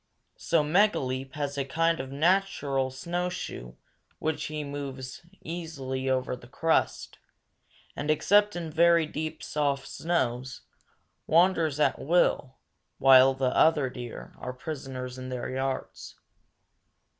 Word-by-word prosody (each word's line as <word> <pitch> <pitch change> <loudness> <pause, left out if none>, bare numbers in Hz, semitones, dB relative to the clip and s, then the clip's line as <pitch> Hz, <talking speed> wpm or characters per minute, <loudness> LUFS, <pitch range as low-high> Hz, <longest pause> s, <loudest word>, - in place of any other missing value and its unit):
So 165 -3 +2
Megaleep 135 -7 +1
has 145 -1 -3
a - - +1
kind 165 +4 +1
of 130 0 -5
natural 145 -4 +1
snowshoe 170 - -4 0.5
with 160 0 0
which - - -7
he 150 -1 -4
moves 140 -2 -6 0.2
easily 140 -6 -4
over 130 -1 0
the 120 -1 -14
crust, 160 +6 0 0.8
and, 145 - -4
except 205 +6 +3
in 165 -2 -4
very 170 0 +4
deep, 155 +1 -5
soft 140 -2 -1
snows, 130 -6 -2 0.7
wanders 165 -3 +3
at - - +2
will, 140 -4 +1 0.4
while 135 0 +6
other 135 +1 +3
deer 120 -2 -8
are 125 - -5
prisoners 130 -3 -6
in 130 0 -6
their 125 0 -4
yards. 130 0 -4
140 Hz, 120 wpm, -28 LUFS, 130-165 Hz, 0.8 s, while